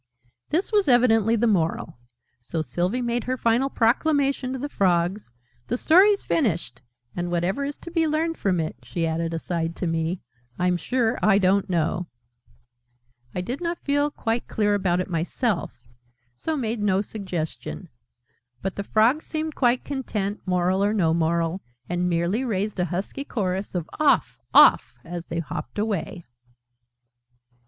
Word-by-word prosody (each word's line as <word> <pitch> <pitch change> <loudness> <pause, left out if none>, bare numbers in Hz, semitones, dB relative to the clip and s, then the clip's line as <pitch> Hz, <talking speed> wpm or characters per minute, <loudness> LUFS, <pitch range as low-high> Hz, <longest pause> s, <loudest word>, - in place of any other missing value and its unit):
This 350 +8 0
was 415 -5 +3
evidently 230 -3 +4
the 230 +1 +1
Moral: 165 - 0 0.4
so 155 +6 -3
Sylvie 180 - -1
made 240 0 -1
her 255 +1 -1
final 240 +3 +2
proclamation 270 +2 +1
to 265 - -3
the 275 +3 -3
Frogs. 185 - 0 0.4
"The 245 - -1
Story's 390 +9 +5
finished! 170 - -1 0.3
And 175 0 -2
whatever 175 +9 0
is 285 +1 -3
to 340 - -8
be 325 -2 +2
learned 320 +2 0
from 190 - 0
it," 160 -1 -3
she 170 -2 -3
added, 165 +1 -1
aside 165 0 -2
to - - -3
me, 165 +2 -1 0.4
"I'm 180 0 +2
sure 235 +6 0
I 205 -2 +5
don't 195 0 +2
know!" 170 0 0 1.3
I 180 - -1
did 250 - -4
not 340 0 -3
feel 285 +1 +2
quite 235 -4 -2
clear 210 -1 +1
about 185 -3 +1
it 185 - -2
myself, 175 - -2 0.5
so 315 - -2
made 230 -4 -2
no 195 -2 +2
suggestion: 185 -4 -5 0.8
but 195 - -3
the 200 - -2
Frogs 230 +9 +2
seemed 315 0 -3
quite 245 -2 +2
content, 215 -7 -3
Moral 185 +1 +2
or 205 +2 +1
no 165 -6 +2
Moral, 170 +2 0 0.3
and 175 +1 0
merely 175 +8 0
raised 210 -4 -2
a 180 - +2
husky 190 - -4
chorus 195 -7 -3
of 175 -2 -2
"Off! 305 -2 +2
Off!" - - +6
as 170 0 -6
they 170 - -4
hopped 135 -5 -6
away. 200 -5 -2
200 Hz, 155 wpm, -24 LUFS, 175-250 Hz, 1.3 s, Off